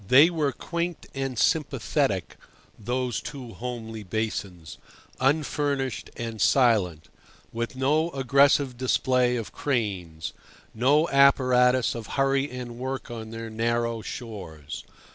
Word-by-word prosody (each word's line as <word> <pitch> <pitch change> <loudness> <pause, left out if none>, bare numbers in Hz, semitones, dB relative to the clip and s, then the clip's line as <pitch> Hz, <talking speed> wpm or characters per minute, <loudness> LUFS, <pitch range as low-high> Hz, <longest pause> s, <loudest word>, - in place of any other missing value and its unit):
They 145 - +7
were 155 -4 0
quaint 170 +4 -4
and 135 -2 -3
sympathetic, 135 - +1 0.4
those 125 +2 -2
two 130 -5 -8
homely 115 -2 -6
basins, 100 -5 -4 0.4
unfurnished 140 -2 0
and 115 -2 -4
silent, 100 - +3 0.5
with 115 +2 -3
no 150 +5 +2
aggressive 140 -1 +3
display 125 -1 +2
of 115 -3 -4
cranes, 95 - -2 0.4
no 145 +8 +3
apparatus 130 -3 +4
of 115 -2 -6
hurry 135 +1 +2
and 125 -2 -7
work 130 -1 -4
on 110 -2 -6
their 115 0 -6
narrow 115 +1 0
shores. 90 -12 -7
125 Hz, 110 wpm, -26 LUFS, 110-135 Hz, 0.5 s, They